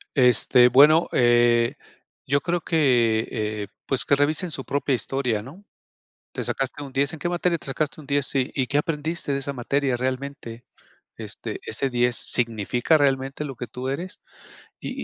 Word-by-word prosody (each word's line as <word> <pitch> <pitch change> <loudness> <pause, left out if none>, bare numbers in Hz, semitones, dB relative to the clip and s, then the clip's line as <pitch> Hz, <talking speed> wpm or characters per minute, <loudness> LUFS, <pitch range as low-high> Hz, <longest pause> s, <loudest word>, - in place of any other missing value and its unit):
Este, 125 -1 +5
bueno, 150 +6 +6
eh, 120 +1 +3 0.5
yo 140 +1 +2
creo 175 +4 -1
que, 120 -9 +2
eh, 105 -2 -3 0.2
pues, 130 -2 0
que 140 - +3
revisen 155 +5 0
su 135 -3 -5
propia 140 0 -1
historia, 125 -2 -1
¿no?, 145 - -13 0.7
"Te - - -4
sacaste 135 +1 -3
un 135 - -10
10, 140 +3 0
¿en 160 - -7
qué 160 - -2
materia 175 0 0
te - - -11
sacaste 140 +2 -3
un 150 - -13
10?, 140 0 +1
sí, 135 -3 -1
¿y 130 -3 -1
qué 145 - +1
aprendiste 155 0 -2
de 140 - -1
esa 140 +1 -4
materia 135 +1 -1
realmente? 130 -1 -5 0.5
Este, - - -6
ese 135 - -2
10, 120 0 +1
¿significa 120 +5 +2
realmente 135 0 0
lo 135 -3 -7
que 125 - -6
tú 125 +2 -6
eres?" 170 +7 -5 0.6
Y - - -5
135 Hz, 170 wpm, -24 LUFS, 125-145 Hz, 0.7 s, bueno